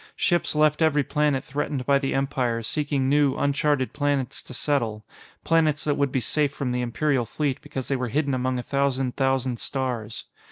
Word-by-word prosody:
Ships 175 -3 +1
left 150 +1 +3
every 150 -2 +3
planet 145 -2 +1
threatened 140 -2 -3
by 140 0 +4
the 135 -1 -1
Empire, 130 -4 0
seeking 145 +1 0
new, 140 -1 +3
uncharted 140 -1 +1
planets 145 -3 -1
to - - -14
settle 120 -6 -1 0.4
planets 155 -3 +2
that 150 - +1
would 140 -2 0
be 130 - +1
safe 145 +3 +1
from 140 -3 -3
the 125 0 -1
Imperial 130 +2 0
Fleet 140 +4 -2
because 130 -2 -6
they 140 - 0
were 125 -1 -2
hidden 140 +3 0
among 130 0 0
a 125 - -3
thousand 135 -2 0
thousand 130 -3 0
stars. 120 -5 -3
135 Hz, 185 wpm, -25 LUFS, 130-145 Hz, 0.4 s, by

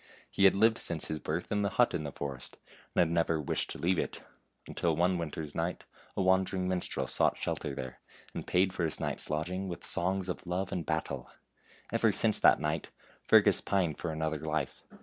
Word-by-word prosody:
He 100 - +3
had 95 - +7
lived 110 +3 +4
since 80 -2 -3
his 80 - -2
birth 80 +4 -3
in 105 0 +1
the 100 - +1
hut 120 - +5
in 75 - -2
the 70 - -4
forest, 70 -2 -6 0.4
and - - +5
had 85 - +3
never 85 -1 +2
wished 75 - -1
to - - -5
leave 90 +1 +1
it, - - -3 0.4
until 85 -2 0
one 90 +2 +2
winter 80 -1 -4
night 85 +2 -2 0.3
a 95 - +2
wan 95 0 +5
dering 95 0 -2
minstrel 90 -1 -1
sought - - +2
shelter 70 - -2
there, 65 -1 -6 0.3
and - - -6
paid 95 +1 +3
for 90 - -2
his 80 - -1
night's - - -3
lodging 90 +5 -2
with 85 -3 -6
songs 95 +2 0
of 90 0 -5
love 90 +2 -2
and 85 - -3
battle. 80 -1 -2 0.6
Ever - - +3
since - - +2
that - - +6
night 75 +1 -2 0.3
Fergus - - +5
pined 90 -6 0
for 85 - -2
another 80 -1 -2
life. 80 0 -2
85 Hz, 205 wpm, -31 LUFS, 80-95 Hz, 0.6 s, had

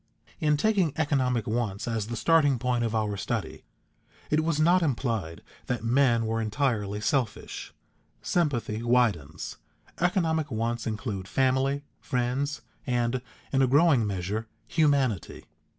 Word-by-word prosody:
In 150 -1 +2
taking 190 -4 +2
economic 130 -7 +1
wants 110 -2 -2
as 110 -3 -1
the 120 - -4
starting 145 -1 +4
point 120 0 0
of 115 -1 -1
our 105 -2 0
study, 100 - -4 0.7
it 155 +1 +3
was 160 -2 0
not 175 +4 +5
implied 115 - -1 0.2
that 125 -2 -2
men 120 -1 +3
were 115 +1 -1
entirely 105 -3 -1
selfish. 120 -1 -2 0.5
Sympathy 120 -10 0
widens; 110 - 0 0.4
economic 165 -3 +1
wants 115 0 -2
include 105 -4 -4
family, 135 +3 +1 0.2
friends, 130 +4 -1 0.3
and, 120 0 0 0.3
in 135 - +3
a 130 - +4
growing 140 -4 +4
measure, 100 +3 -3 0.2
humanity. 140 - +1
125 Hz, 125 wpm, -27 LUFS, 110-145 Hz, 0.7 s, not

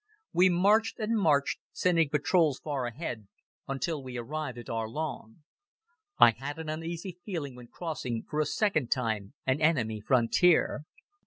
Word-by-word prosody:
We 185 +1 +5
marched 205 +6 +3
and 225 0 -1
marched, 150 -9 +2
sending 165 -4 +2
patrols 150 0 +2
far 140 -5 -3
ahead, 120 - -6 0.4
until 135 +3 -2
we 130 -2 -7
arrived 130 +1 -4
at 120 - -9
Arlon. 115 +3 -4 0.7
I 120 - +8
had 135 +6 -6
an 160 -1 -6
uneasy 165 +3 -5
feeling 160 -9 -4
when 125 -1 -12
crossing, 130 -8 -4
for 150 - -3
a 155 - +2
second 155 - +1
time, 110 -3 -1
an 130 +3 +1
enemy 120 -9 +2
frontier. 135 - +3
150 Hz, 145 wpm, -29 LUFS, 120-165 Hz, 0.7 s, I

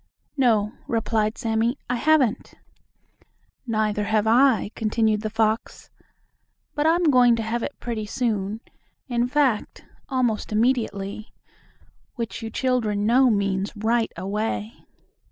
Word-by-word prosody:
"No," 225 -6 +2
replied 225 -1 0
Sammie, 225 +3 0
"I 245 - -1
haven't." 270 -4 +1 1.1
"Neither 215 -2 0
have 215 0 +1
I," 235 -2 +3
continued 220 -1 +1
the 215 - -3
fox, 220 0 -2 0.8
"but 295 +1 +1
I'm 330 -1 +3
going 245 -2 +5
to 225 - -3
have 230 +2 -2
it 285 - -5
pretty 220 -3 -4
soon, 215 -2 -2 0.5
in 240 -1 0
fact, 260 -5 0 0.2
almost 245 -6 -1
immediately," 215 -3 -1 0.8
which 230 0 -5
you 225 - -5
children 220 -4 0
know 250 +3 +5
means 200 -2 0
right 225 +2 0
away. 210 +4 -3
225 Hz, 120 wpm, -24 LUFS, 215-245 Hz, 1.1 s, going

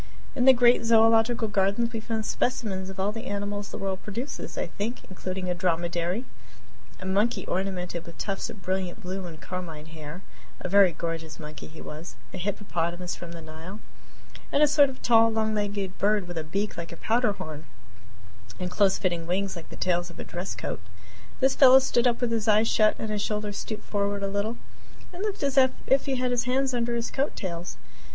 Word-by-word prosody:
In 250 - +2
the 265 - +11
great 240 -1 +5
Zoological 225 0 +5
Gardens 205 +3 +1
we 225 - -1
found 220 -1 -3
specimens 215 -7 -1
of 195 0 -8
all 195 +2 +1
the 225 +3 -6
animals 205 0 -3
the - - -6
world 190 -1 -3
produces, 235 +7 -5
I - - 0
think, 225 +5 -4
including 185 0 -4
a 180 - +1
dromedary, 175 +4 0 0.7
a 185 - -8
monkey 200 +2 +1
ornamented 180 -3 -2
with 170 - -10
tufts 195 -2 -2
of 190 - -10
brilliant 185 +2 -2
blue 185 0 -4
and 160 -2 -9
carmine 170 -4 -6
hair 160 +2 -9 0.4
a - - -3
very 195 0 +6
gorgeous 165 -1 -5
monkey 150 -2 -8
he 160 0 -11
was 155 +3 -8 0.2
a 185 - -5
hippopotamus 180 -2 -2
from 170 -1 -8
the 165 -1 -8
Nile, 160 +6 -9 0.7
and 290 - +4
a - - +7
sort 290 -1 +6
of 260 - -10
tall, 230 -1 +6
long 220 0 +1
legged 205 -2 -2
bird 205 -2 +2
with 175 -2 -4
a - - -3
beak 195 +6 -2
like 170 -1 -5
a - - -8
powder 230 -1 +2
horn 155 -4 -7 0.9
and 180 0 -3
close 195 -1 +3
fitting 175 -3 -1
wings 190 +2 0
like 170 - -9
the - - -9
tails 175 -1 0
of 170 - -13
a - - -5
dress 175 +2 -5
coat. - - -4 0.6
This 265 0 +5
fellow 265 -1 +9
stood 255 -2 +3
up 240 0 +1
with 245 -2 +1
his 225 -1 0
eyes 215 +1 +5
shut 215 -1 +4
and 220 - -4
his 210 -1 -1
shoulders 210 -1 -2
stooped 215 - -5
forward 200 -1 -1
a - - +1
little, 205 +4 -1 0.6
and 355 - -7
looked 415 -6 -2
as 275 -1 +4 0.3
if 270 +2 +3
he 270 - +1
had 250 0 0
his 240 -1 +1
hands 260 +1 +1
under 240 -1 0
his 235 0 -2
coat 280 +2 -1
tails. 175 -3 -5
200 Hz, 205 wpm, -27 LUFS, 180-230 Hz, 0.9 s, the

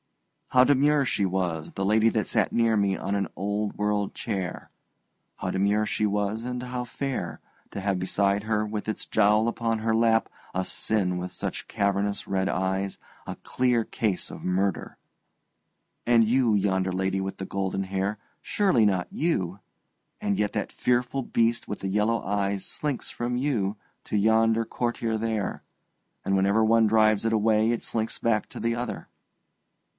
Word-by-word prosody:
How 125 0 +5
demure 145 +1 +3
she 100 -5 0
was, 90 -4 -2
the 95 - -2
lady 110 +2 +4
that 110 -1 -1
sat - - +1
near 115 -1 +3
me 100 -2 +1
on 100 +1 -2
an 100 -1 0
old 105 +2 -2
world 105 -1 0
chair 95 -5 -4 0.7
how - - -3
demure 100 +3 +2
she 105 - 0
was, 105 +2 -1
and 125 0 -4
how 125 0 -4
fair, 135 +2 -4 0.3
to - - -6
have 95 -1 0
beside 100 +2 +1
her 110 -1 0
with 105 0 -4
its 110 - -3
jowl 110 +1 +3
upon 115 -1 -1
her 110 0 +1
lap 115 0 +3 0.3
a 95 0 0
sin 95 -5 -1
with 90 +1 -4
such - - -5
cavernous 100 0 0
red 95 0 0
eyes, 95 +1 -1 0.3
a - - -4
clear 125 -3 +1
case 105 -5 -2
of - - -9
murder. 95 +1 -1 1.1
And 115 -1 +5
you, 120 -2 +3
yonder 95 -2 +1
lady 95 +1 -1
with 95 0 -4
the 95 - -5
golden 95 0 -2
hair, 95 +2 -2 0.2
surely 185 - +2
not 95 -3 +1
you 100 - -1 0.6
and 100 -1 0
yet 105 0 +1
that - - -2
fearful 125 +2 0
beast 115 -1 0
with 105 - -4
the 95 - -3
yellow 105 +3 +1
eyes 100 0 -1
slinks 145 -4 -3
from 120 +1 -3
you 110 -7 0 0.3
to 105 - -1
yonder 110 +2 +3
courtier 115 -1 -2
there, 110 -3 -2 0.6
and 95 - +2
whenever 100 +3 +3
one 115 0 +4
drives 110 -1 +4
it 115 - +1
away 110 0 +3
it 120 - -2
slinks 110 -1 -2
back 110 -2 0
to - - -8
the 115 0 0
other. 120 -1 -4
105 Hz, 165 wpm, -26 LUFS, 100-115 Hz, 1.1 s, How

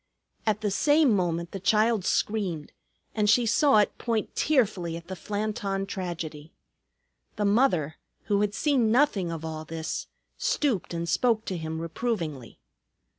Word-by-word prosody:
At 215 -1 +1
the 210 -2 0
same 290 +2 +4
moment 170 -2 -1
the 195 - -5
child 215 0 +2
screamed, 190 -8 -1 0.4
and 210 -2 +1
she 235 +3 +5
saw 230 +4 +4
it 210 - +3
point 230 -3 -2
tearfully 200 - +1
at 170 - -11
the 190 - -5
Flanton 205 -1 -2
tragedy. 165 -5 -5 0.8
The 210 - -1
mother, 200 - +2 0.3
who 205 -2 +1
had 205 -1 0
seen 250 -2 +2
nothing 225 - +2
of 165 -1 -5
all 155 -1 -5
this, 160 0 -4 0.3
stooped 230 - 0
and 170 0 -3
spoke 225 +3 +2
to 185 - -3
him 160 -1 -4
reprovingly. 165 - -3
200 Hz, 145 wpm, -27 LUFS, 165-220 Hz, 0.8 s, she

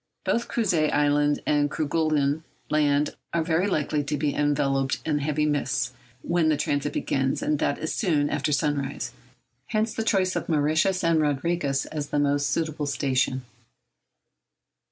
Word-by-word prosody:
Both 235 - 0
Crozet 180 -10 +1
Island 145 0 +2
and 145 -1 +2
Kerguelen 155 -1 0 0.3
Land 150 -1 +2 0.2
are 165 - +2
very 170 +3 +1
likely 150 -5 0
to 150 +1 -1
be 145 0 0
enveloped 135 -2 +1
in 150 -2 +1
heavy 150 +1 0
mists 140 -4 0 0.3
when 170 -2 +2
the 155 - +2
transit 145 0 -1
begins—that 140 +2 0
is, 160 - -3
soon 155 -8 +1
after 145 +1 -1
sunrise—hence 140 - -3
the 225 - -2
choice 190 -4 +1
of - - -3
Mauritius 160 +4 +2
and 165 -1 +3
Rodriguez 145 -1 0
as 150 -2 -5
the - - -1
most 145 0 +2
suitable 155 -2 -1
station. 130 -1 0
150 Hz, 135 wpm, -25 LUFS, 140-160 Hz, 0.3 s, and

